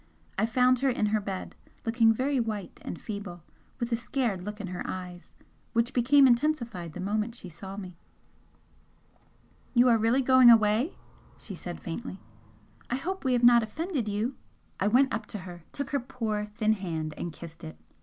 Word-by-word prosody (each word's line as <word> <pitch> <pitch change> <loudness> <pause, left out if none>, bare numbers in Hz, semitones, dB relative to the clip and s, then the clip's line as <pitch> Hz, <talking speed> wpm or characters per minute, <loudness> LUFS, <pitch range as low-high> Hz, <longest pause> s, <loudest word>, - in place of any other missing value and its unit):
I 215 +3 +1
found 250 +2 +3
her 270 +1 +2
in 240 -4 +1
her 215 - +2
bed, 195 -2 -5 0.3
looking 225 0 +4
very 260 +4 0
white 215 -5 -4
and - - -6
feeble, 200 -6 -7 0.4
with 240 -1 -2
a - - +3
scared 230 -5 -2
look 210 +2 -6
in 205 - -4
her 180 -1 -5
eyes 180 -1 -7 0.4
which 235 +1 +1
became 265 +3 +5
intensified 235 - +1
the - - -8
moment 215 +4 -1
she 185 - -9
saw 190 +4 -9
me. 180 -4 -8 1.8
"You 245 +1 +6
are 230 -2 +4
really 230 +5 +3
going 260 -1 +7
away?" 225 - +4 0.4
she 200 - -8
said, 175 -1 -7
faintly 190 +3 -6 0.7
"I 245 - 0
hope 375 +8 -4
we 260 -2 +2
have 245 -1 +1
not 240 0 +8
offended 275 - -3
you?" 215 +6 -1 0.5
I 200 - +2
went 255 +5 +4
up 215 - -3
to - - -6
her, 175 -3 -10
took 280 - -5
her 280 - +1
poor 225 -5 -3
thin 215 -1 +2
hand 165 -6 -4
and 175 - -4
kissed 165 +1 -11
it. 80 0 -8
225 Hz, 180 wpm, -28 LUFS, 190-250 Hz, 1.8 s, not